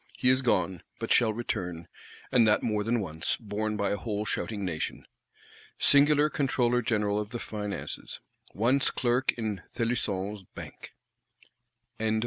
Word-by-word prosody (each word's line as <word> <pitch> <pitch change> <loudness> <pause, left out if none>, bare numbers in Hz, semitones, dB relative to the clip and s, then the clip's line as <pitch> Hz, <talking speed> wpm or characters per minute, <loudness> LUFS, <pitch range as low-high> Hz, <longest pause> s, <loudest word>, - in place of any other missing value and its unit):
He 125 - +4
is 130 +1 +5
gone; 95 -8 +1 0.2
but - - -4
shall 115 -2 +4
return, 90 -7 -4 0.4
and 115 -3 +5
that 105 - +3
more 105 -2 0
than 115 +1 +1
once, 80 -4 -2
borne 105 -1 -2
by 100 - 0
a 100 - 0
whole 105 0 -3
shouting 105 -2 -2
Nation. 80 -4 -3 0.7
Singular 145 +1 +5
Controller 125 -4 +1
General 105 -3 +1
of 105 -1 -4
the 120 - -4
Finances; 105 -3 -5 0.3
once 125 +6 +2
Clerk 125 +1 +1
in 110 -5 -3
Thelusson's 105 -4 -1
Bank! - - -10 1.0
Chapter 110 - -1
1. 110 - +1
110 Hz, 145 wpm, -29 LUFS, 100-120 Hz, 1.0 s, is